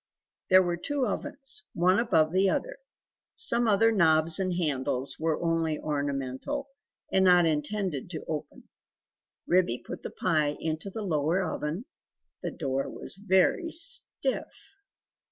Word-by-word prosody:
There 185 0 +7
were 175 -1 -1
two 280 +9 -1
ovens, 275 -7 -2
one 185 +4 +3
above 165 -9 +2
the 190 +2 +3
other; - - -2 0.6
some 240 - +4
other 225 +2 +4
knobs 160 -4 +4
and 185 -1 0
handles 135 -5 -1
were 160 -1 0
only 165 -2 0
ornamental 145 - -3 0.4
and 190 - +3
not 180 -2 +6
intended 160 0 -2
to 165 -3 -7
open. 155 -2 -6 0.8
Ribby 175 -9 +2
put - - -7
the - - -6
pie 155 -5 0
into 160 +4 -3
the 215 +2 -6
lower 165 +1 0
oven; 160 +10 -4 0.6
the - - -3
door 135 -3 -3
was - - -7
very 200 - +2
stiff. 345 +9 -1
175 Hz, 135 wpm, -28 LUFS, 155-210 Hz, 0.8 s, There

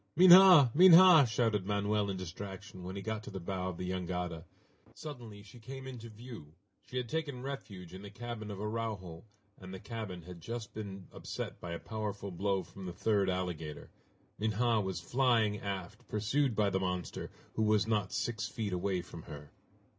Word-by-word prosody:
"Minha! 180 -6 +9
Minha!" 175 -3 +9
shouted 110 -4 0
Manoel 105 0 0
in 95 - -3
distraction, 95 +2 -8
when 95 +2 -6
he 100 - -5
got 110 0 -3
to - - -9
the 95 - -6
bow 95 +1 -3
of 90 - -6
the 90 - -4
jangada. 90 -2 -3 0.5
Suddenly 120 -9 -9
she 110 +4 -14
came 130 +4 -8
into 120 -3 -8
view. 110 -9 -11 0.3
She 125 - -6
had 125 -1 -2
taken 145 -2 -3
refuge 100 -11 -7
in 95 - -8
the 100 - -9
cabin 115 0 -7
of 100 -2 -6
Araujo, 105 -6 -4 0.3
and 95 -1 -10
the 95 - -7
cabin 105 -5 -6
had 90 0 -10
just 115 +3 -6
been 100 -3 -7
upset - - -6
by 85 -1 -5
a - - -3
powerful 105 -3 -5
blow 95 +1 0
from 90 +2 -10
the 90 - -5
third 100 +1 +1
alligator. 90 -5 -4 0.5
Minha 110 +1 +2
was 95 -2 -3
flying 115 -5 +2
aft, 95 -3 -6
pursued 115 +4 0
by 105 -2 +2
the 95 - +1
monster, 90 -1 -3 0.2
who - - -2
was 105 -2 +3
not 105 -4 0
six 105 0 -2
feet 105 -5 -4
away 90 0 -1
from 85 - -10
her. 75 -1 -10
105 Hz, 180 wpm, -32 LUFS, 95-115 Hz, 0.5 s, Minha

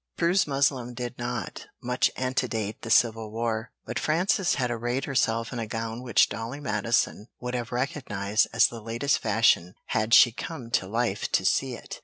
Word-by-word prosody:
Prue's 170 +1 +2
muslin 135 -3 0
did 120 0 -5
not 120 -3 -4
much 125 +1 +1
antedate 125 -5 -2
the 115 - -7
civil 110 -1 +3
war, 115 0 -2
but - - -3
Frances 180 +4 +1
had 125 -3 -1
arrayed 120 +3 -2
herself 115 -3 0
in 120 - -4
a 115 - -3
gown 115 +1 -4
which 120 -4 +4
Dolly 115 +5 -5
Madison 110 -3 0
would 125 0 -5
have 120 -1 -3
recognized 110 -5 0
as 115 - +5
the 115 -1 -3
latest 115 +6 0
fashion 105 -5 +2
had 110 +1 +3
she 120 - +8
come 120 -1 -7
to 95 - +1
life 115 -1 -1
to - - +2
see - - +1
it. - - -9
120 Hz, 175 wpm, -26 LUFS, 110-130 Hz, -, she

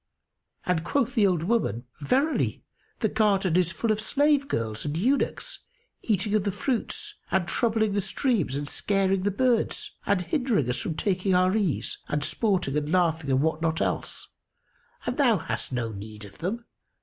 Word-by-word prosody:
and 175 -3 +1
quoth 260 +4 0
the 215 -6 +4
old 175 -4 +1
woman, 170 - 0
"Verily 270 - +1 0.4
the 220 - +3
garden 200 -5 +2
is 180 -2 +3
full 225 +4 -1
of 215 0 0
slave 285 +4 +2
girls 110 - -2
and 150 +1 -2
eunuchs, 275 - 0 0.4
eating 205 -1 0
of 215 -2 +3
the 205 - 0
fruits 280 - -2 0.2
and 185 -2 +1
troubling 220 0 +1
the 200 - +1
streams 195 - 0
and 145 0 -3
scaring 195 +2 +1
the 200 - +1
birds 235 +3 +1 0.2
and 195 -2 +2
hindering 205 - +1
us 125 +1 0
from 160 - -3
taking 185 +1 +1
our 185 +2 +3
ease 200 -9 0
and 150 -1 -1
sporting 185 - 0
and 150 0 -1
laughing 165 -4 +2
and 135 +1 +3
what 160 0 0
not 165 0 0
else; - - -2 0.8
and - - -2
thou 245 -7 +4
hast 160 - -4
no 120 -3 -2
need 105 +1 -9
of 100 -1 -14
them. 215 +8 -3
190 Hz, 175 wpm, -26 LUFS, 160-225 Hz, 0.8 s, the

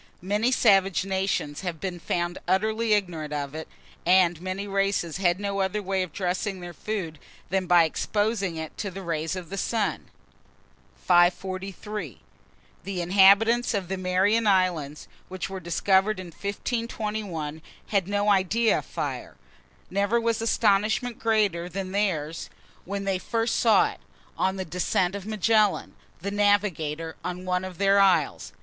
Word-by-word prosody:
Many 210 +6 +1
savage 195 -6 +3
nations 190 -6 -1
have 175 -4 -4
been 180 -1 -4
found 175 +1 -2
utterly 215 +4 +1
ignorant 170 -7 -1
of 140 -1 -3
it, 160 0 -6 0.4
and 175 -2 +4
many 185 +2 -4
races 195 -4 0
had 180 -1 +1
no 200 -1 -2
other 195 +2 -1
way 190 0 0
of 185 -3 -4
dressing 185 +3 -2
their 175 -1 -8
food 170 -5 -4 0.3
than 190 -1 0
by 175 -1 +6
exposing 205 +2 -1
it 160 -1 -6
to 200 - -2
the 195 +1 -8
rays 165 0 -2
of 185 -1 -8
the 195 - -3
sun. 220 0 -1 0.9
543. 185 - 0 0.6
THE 195 -1 -4
INHABITANTS 200 +6 +5
OF 190 -3 -3
THE 190 - -2
MARIAN 190 +5 +2
ISLANDS, 175 -7 +1 0.2
which 185 0 -5
were 190 - -4
discovered 190 +4 +1
in 185 -2 -7
1521, 205 - -4 0.3
had 195 -4 +1
no 205 +1 +1
idea 205 +4 +2
of - - -10
fire. - - -5 0.6
Never 200 +4 +1
was 230 -1 0
astonishment 220 +2 +1
greater 205 -6 +1
than 185 +1 -5
theirs 165 -6 -1 0.4
when 200 +1 -4
they 195 -2 0
first 225 +3 -1
saw 225 -2 +4
it, - - -14 0.4
on 190 0 0
the 190 -1 -4
descent 180 +2 0
of 200 0 -6
Magellan, 215 -1 +2 0.3
the 200 +3 -3
navigator, 180 -7 0
on 180 +1 -5
one 180 0 0
of 185 -2 -7
their 200 0 +4
isles. 180 -7 +2
190 Hz, 150 wpm, -26 LUFS, 175-205 Hz, 0.9 s, by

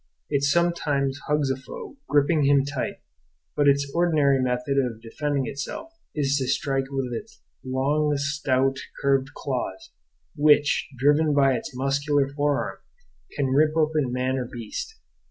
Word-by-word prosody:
It 140 - +2
sometimes 145 -3 +1
hugs 150 -2 +1
a - - 0
foe, 135 - -9
gripping 145 +1 +3
him 140 -1 +4
tight; 140 -2 -4 0.5
but 145 -1 +3
its 140 0 +3
ordinary 150 -6 +3
method 125 +2 0
of 120 -4 -1
defending 140 +4 -2
itself 145 - -6 0.2
is 140 -2 +1
to 130 - -2
strike 135 0 0
with 135 -3 -3
its 220 - -7 0.2
long, 140 +4 +1
stout, 135 -2 0 0.2
curved 135 -1 +1
claws, 125 -8 -4 0.4
which, 145 0 +4
driven 145 +3 +3
by 135 -2 +4
its 125 - -5
muscular 140 +2 +1
forearm, 145 0 -1 0.6
can 140 -2 0
rip 155 +3 +3
open 155 -4 +1
man 130 +1 0
or 125 - -3
beast. 120 - -6
140 Hz, 140 wpm, -25 LUFS, 135-150 Hz, 0.6 s, him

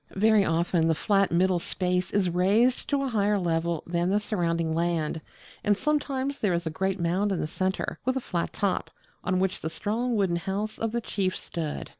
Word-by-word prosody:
Very 215 +1 +5
often 165 -1 +1
the 165 - +3
flat 195 +3 +2
middle 180 +1 +3
space 180 +1 -1
is 200 -2 +1
raised 200 +8 +2
to 280 -1 +1
a - - 0
higher 210 -2 +2
level 170 -2 0
than 170 +1 0
the 205 +2 +3
surrounding 170 -6 -1
land, 165 -1 0 0.4
and 205 -1 +3
sometimes 280 0 -1
there 200 -4 +1
is 170 0 -2
a 160 - -2
great 190 +3 -1
mound 180 +4 +1
in 190 - 0
the - - -1
centre, 185 +4 -2
with 260 +1 0
a - - +1
flat 175 -8 -2
top, 195 -3 -1 0.3
on 185 +1 +1
which 190 +2 0
the 160 - -2
strong 230 +7 -1
wooden 190 -5 +1
house 200 +4 -3
of 225 -1 -1
the 235 +1 -1
chief 190 -4 -1
stood. 160 -3 -5
190 Hz, 200 wpm, -27 LUFS, 170-210 Hz, 0.4 s, Very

